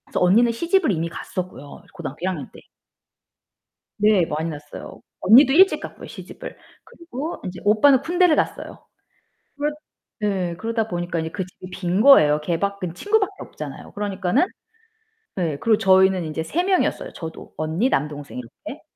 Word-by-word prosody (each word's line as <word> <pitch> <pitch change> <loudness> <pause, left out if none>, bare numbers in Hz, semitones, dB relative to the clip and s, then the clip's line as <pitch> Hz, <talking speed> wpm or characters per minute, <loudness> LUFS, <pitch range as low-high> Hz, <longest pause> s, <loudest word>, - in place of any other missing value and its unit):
그래서 - - -3
언니는 220 +7 +5
시집을 340 - +1
이미 165 -2 -1
갔었고요, 170 -5 -7
고등학교 160 -6 -7
1 185 - 0
학년 185 - -5
때. - - -14 1.4
네 210 -4 +4
많이 160 +1 -3
났어요. 145 -1 -9 0.2
언니도 260 +6 +7
일찍 380 +5 +6
갔고요 - - -9
시집을. - - -10 0.3
그리고 325 -1 -7
인제 180 -1 -6
오빠는 240 +6 +5
군대를 350 +1 +3
갔어요. - - -3 0.7
그렇 295 +1 0 0.5
네. 190 -5 -1
그러다 225 +2 -2
보니까 175 -3 -3
이제 160 0 -3
그 190 +2 -4
집이 185 0 -13
빈 185 +1 -1
거예요. 155 - +7
걔 165 +2 -2
밖에는 200 -4 -3
친구밖에 410 - +1
없잖아요. - - -9
그러니까는 205 - 0 0.9
예. 165 -6 -1
그리고 220 +4 +3
저희는 190 -1 +4
인제 155 +1 -3
3 310 - -1
명이었어요 375 -1 0
저도 160 -1 -9
언니, 160 +11 0
남동생 145 - -3
이렇게. 115 -2 -10
190 Hz, 355 characters per minute, -22 LUFS, 165-250 Hz, 1.4 s, 언니도